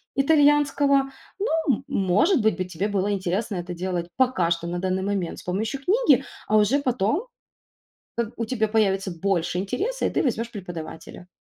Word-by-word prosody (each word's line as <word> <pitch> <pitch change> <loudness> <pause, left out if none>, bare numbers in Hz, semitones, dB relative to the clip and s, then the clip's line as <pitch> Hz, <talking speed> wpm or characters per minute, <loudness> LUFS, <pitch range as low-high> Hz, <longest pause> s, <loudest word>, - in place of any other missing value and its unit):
итальянского. 285 -1 +3 0.3
Ну, 410 - 0 0.3
м 265 - -10
может 265 - +2
быть, 215 -1 +2
бы 185 - -2
тебе 180 +3 -3
было 200 0 0
интересно 195 +3 -1
это 175 0 -4
делать 175 -1 -3
пока 250 -10 +2
что 170 0 -1
на 175 +1 -3
данный 185 +1 -1
момент 195 -4 -2
с - - -12
помощью 220 +9 -2
книги, 465 - +4 0.2
а 215 - +3
уже 215 +7 +3
потом, 255 - 0 0.9
как 235 -1 -2
у 230 - 0
тебя 220 -2 0
появится 195 -3 +1
больше 175 0 -1
интереса 405 - -2
и - - 0
ты - - 0
возьмешь 230 -3 -1
преподавателя. 175 -3 -8
205 Hz, 170 wpm, -24 LUFS, 185-270 Hz, 0.9 s, книги